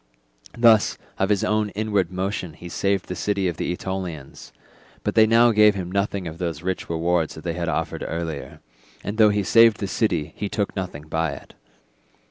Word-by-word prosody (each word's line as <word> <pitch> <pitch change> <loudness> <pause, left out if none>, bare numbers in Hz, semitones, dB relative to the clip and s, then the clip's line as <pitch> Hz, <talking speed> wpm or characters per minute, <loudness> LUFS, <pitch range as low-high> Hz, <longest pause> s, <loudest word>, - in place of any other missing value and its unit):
Thus 115 -3 +5 0.2
of 95 - +1
his 105 -2 +2
own 105 0 +1
inward 105 -4 0
motion 95 -2 -3
he 85 +2 -10
saved 100 +1 0
the 90 - -5
city 100 +1 0
of 85 -3 -3
the - - -2
Aetolians; 90 -6 -6 0.5
but - - -1
they 110 -1 +6
now 115 +1 +5
gave 105 -1 +5
him 90 -2 -5
nothing 100 -1 -1
of 80 +1 -8
those 85 -3 -3
rich 95 0 -3
rewards 85 0 0
that 80 - -10
they 85 - -2
had 85 0 -3
offered - - -2
earlier, 80 -3 -5 0.4
and 105 +3 -5
though 110 -1 +7
he 105 0 +1
saved 115 +2 +6
the 100 - -3
city 85 -7 -1
he 105 - -4
took 100 0 -2
nothing 90 -7 -5
by 80 +1 -1
it. - - -12
95 Hz, 190 wpm, -23 LUFS, 85-105 Hz, 0.5 s, though